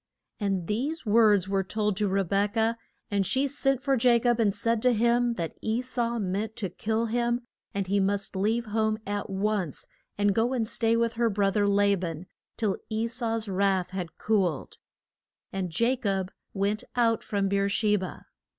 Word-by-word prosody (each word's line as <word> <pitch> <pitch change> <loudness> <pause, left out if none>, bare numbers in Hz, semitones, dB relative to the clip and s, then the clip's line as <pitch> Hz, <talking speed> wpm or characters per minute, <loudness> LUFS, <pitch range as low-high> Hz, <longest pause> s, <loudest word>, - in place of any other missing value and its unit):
] - - -54
And 195 -4 -1
these 270 - -2
words 210 -3 +4
were 195 0 +1
told 210 +1 -1
to 210 -1 +1
Re 195 +1 +1
bek 200 +3 0
ah, 225 +1 +2 0.4
and 200 -1 +2
she 265 +8 +1
sent 270 -1 0
for 275 -1 +2
Ja 245 -1 +4
cob 240 0 +1
and 215 -3 +3
said 225 +3 0
to 250 +1 +4
him 235 +1 +2
that 170 -5 -3
E 225 +3 -1
sau 240 -2 -1
meant 205 +2 -2
to 195 -5 -4
kill 220 +4 -1
him, 240 +1 0 0.3
and 200 -1 -2
he 200 +2 +1
must 200 0 -1
leave 220 +5 +1
home 220 0 0
at 205 +1 -3
once 195 -5 -1 0.3
and 205 0 +3
go 230 +5 +1
and 230 -4 0
stay 230 0 +1
with 230 0 +1
her 230 - +4
bro 200 -1 +1
ther 205 0 +2
La 200 0 +4
ban 170 -2 -5 0.3
till 210 -4 0
E 220 +1 0
sau's 230 -2 -2
wrath 190 -2 +1
had 180 -4 -5
cooled. 190 -9 0 0.8
And 190 -2 -2
Ja 240 +3 +3
cob 195 -6 -2 0.2
went 200 +2 -1
out 230 -2 +2
from 200 -2 -1
Beer 200 0 +1
she 210 +1 +2
ba. 185 -3 -5
210 Hz, 190 wpm, -27 LUFS, 195-230 Hz, 0.8 s, words